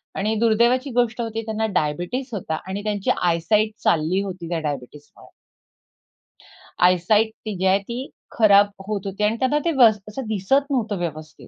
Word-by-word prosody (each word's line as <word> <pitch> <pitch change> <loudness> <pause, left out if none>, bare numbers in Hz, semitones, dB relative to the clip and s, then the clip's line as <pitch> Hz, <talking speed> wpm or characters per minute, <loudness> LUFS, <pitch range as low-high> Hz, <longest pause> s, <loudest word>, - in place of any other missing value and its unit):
आणि 215 +3 -1
दुर्दैवाची 235 +4 +2
गोष्ट 240 -1 0
होती 225 -1 -3
त्यांना 220 0 -2
डायबिटीज 175 - -3
होता 160 -5 -3
आणि 200 +2 -4
त्यांची 205 -2 -2
आय 170 -1 +2
साइट 215 +6 +1
चालली 170 +4 +2
होती 185 -4 -6
त्या 170 -2 -1
डायबिटीजमुळे. 145 -1 -7 1.6
आयसाइट 185 +5 +4 0.2
ती 215 -2 -4
जी 190 - -2
आहे, 190 +1 +4
ती 240 +6 -6 0.3
खराब 205 -2 +6 0.2
होत 205 -2 -3
होती 195 +2 -4
आणि 215 +2 +2
त्यांना 270 +3 +2
ते 335 - +2
वस 220 -4 +6
असं 265 +5 -6
दिसत 270 +8 0
नव्हतं 220 -6 -1
व्यवस्थित. 155 -2 -6
210 Hz, 160 wpm, -22 LUFS, 180-230 Hz, 1.6 s, खराब